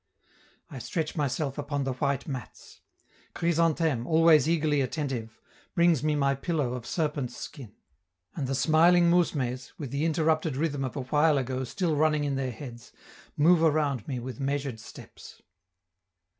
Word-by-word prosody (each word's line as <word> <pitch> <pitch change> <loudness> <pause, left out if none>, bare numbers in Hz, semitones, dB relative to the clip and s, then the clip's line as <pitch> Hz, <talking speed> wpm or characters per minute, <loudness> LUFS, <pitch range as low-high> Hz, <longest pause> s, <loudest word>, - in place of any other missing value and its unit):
I 135 - -7
stretch 155 +7 -3
myself 145 -1 -2
upon 145 -1 -2
the 135 -1 -2
white 140 +1 -2
mats; 130 -6 -8 0.6
Chrysantheme, 165 -6 +1
always 160 -2 +5
eagerly 155 -3 +2
attentive, 130 -5 -4 0.4
brings 170 -4 +4
me 155 -1 +1
my 140 -1 +2
pillow 140 -2 -2
of 125 -2 -6
serpent's 145 -6 -2
skin; 120 -7 -9 0.6
and 140 -5 -3
the 135 - -1
smiling 170 +5 +4
mousmes, 135 -7 0
with 140 -6 -6
the 140 +2 -1
interrupted 160 -2 +1
rhythm 145 -2 -1
of 130 - -4
a 140 - -2
while 150 +3 +3
ago 130 0 -2
still 165 +4 -1
running 150 0 +2
in 145 -1 -1
their 135 -1 -2
heads, 120 0 -10 0.5
move 165 +3 +5
around 150 -6 +1
me 130 - -3
with 130 +3 -7
measured 135 -3 -2
steps. - - -13
145 Hz, 150 wpm, -27 LUFS, 130-160 Hz, 0.6 s, always